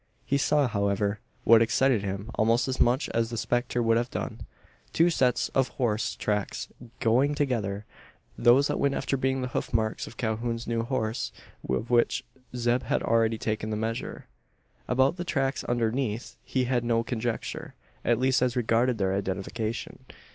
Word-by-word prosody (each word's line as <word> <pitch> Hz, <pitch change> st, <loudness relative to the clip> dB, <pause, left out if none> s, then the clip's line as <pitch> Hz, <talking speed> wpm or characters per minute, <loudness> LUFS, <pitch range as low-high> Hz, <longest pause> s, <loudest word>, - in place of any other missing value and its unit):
He 140 Hz, -, +1 dB
saw, 145 Hz, 0 st, +3 dB
however, 100 Hz, -1 st, 0 dB, 0.2 s
what 115 Hz, 0 st, +7 dB
excited 120 Hz, 0 st, +3 dB
him 100 Hz, +2 st, -4 dB
almost 115 Hz, +3 st, +2 dB
as 130 Hz, -, -2 dB
much 125 Hz, +4 st, +3 dB
as 115 Hz, 0 st, 0 dB
the 115 Hz, -, -4 dB
spectre 120 Hz, +1 st, 0 dB
would 115 Hz, 0 st, +3 dB
have 120 Hz, +1 st, -1 dB
done: -, -, -5 dB, 0.5 s
two 170 Hz, +2 st, +4 dB
sets 125 Hz, -6 st, +2 dB
of 135 Hz, -1 st, +2 dB
horse 115 Hz, -6 st, -1 dB
tracks 105 Hz, -2 st, -2 dB, 0.3 s
going 130 Hz, +6 st, +3 dB
together 110 Hz, -8 st, -1 dB, 0.5 s
those 125 Hz, +4 st, +5 dB
that 145 Hz, -, -1 dB
went 140 Hz, -1 st, +2 dB
after -, -, -1 dB
being 130 Hz, 0 st, 0 dB
the 125 Hz, -, -3 dB
hoof -, -, -3 dB
marks 110 Hz, -1 st, 0 dB
of -, -, -12 dB
Calhoun's 115 Hz, +1 st, -2 dB
new 115 Hz, -1 st, 0 dB
horse 115 Hz, -2 st, -2 dB, 0.4 s
of 105 Hz, -, -1 dB
which 120 Hz, -1 st, +3 dB, 0.3 s
Zeb 120 Hz, +1 st, +1 dB
had -, -, -1 dB
already 115 Hz, 0 st, +2 dB
taken 110 Hz, 0 st, -2 dB
the 105 Hz, -, -2 dB
measure. 115 Hz, +1 st, -4 dB, 0.6 s
About 130 Hz, +6 st, +2 dB
the 175 Hz, -, -3 dB
tracks 135 Hz, -5 st, -1 dB
underneath 115 Hz, -1 st, -1 dB
he 130 Hz, -, 0 dB
had 125 Hz, -1 st, 0 dB
no 115 Hz, -1 st, +1 dB
conjecture 120 Hz, -1 st, -4 dB, 0.3 s
at 120 Hz, -, +3 dB
least 130 Hz, +1 st, +2 dB
as 125 Hz, -1 st, +1 dB
regarded 120 Hz, 0 st, +2 dB
their 95 Hz, -2 st, +1 dB
identification. 100 Hz, +4 st, -3 dB
120 Hz, 165 wpm, -27 LUFS, 110-130 Hz, 0.6 s, what